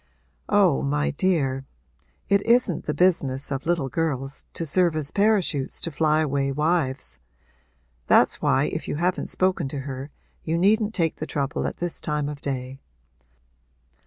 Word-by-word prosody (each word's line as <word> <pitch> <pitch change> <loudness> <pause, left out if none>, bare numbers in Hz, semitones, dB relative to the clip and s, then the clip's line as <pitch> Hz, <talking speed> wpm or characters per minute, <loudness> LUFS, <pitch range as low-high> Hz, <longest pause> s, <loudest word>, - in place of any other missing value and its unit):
'Oh, 65 - +4
my 70 +1 0
dear, 135 - 0 0.6
it 200 0 +3
isn't 235 -7 +2
the 150 - -1
business 145 -7 +1
of 135 +4 -3
little 170 -5 +1
girls 135 -2 -3
to 165 - -3
serve 170 +1 +2
as 155 -2 -2
parachutes 200 -10 +1
to 170 - -3
fly 155 +1 +2
away 140 -2 0
wives! 135 - -1 0.9
That's - - +4
why - - +3
if - - -4
you - - -2
haven't 175 +4 -1
spoken 185 -5 +1
to 135 0 -4
her 135 +1 -6 0.3
you 165 +1 -1
needn't 210 +4 +2
take 165 -3 0
the 155 - -5
trouble 140 -2 -2
at - - -5
this 175 -1 -3
time 150 -2 -1
of 145 -1 -7
day. 130 -1 -4
150 Hz, 155 wpm, -24 LUFS, 135-175 Hz, 0.9 s, Oh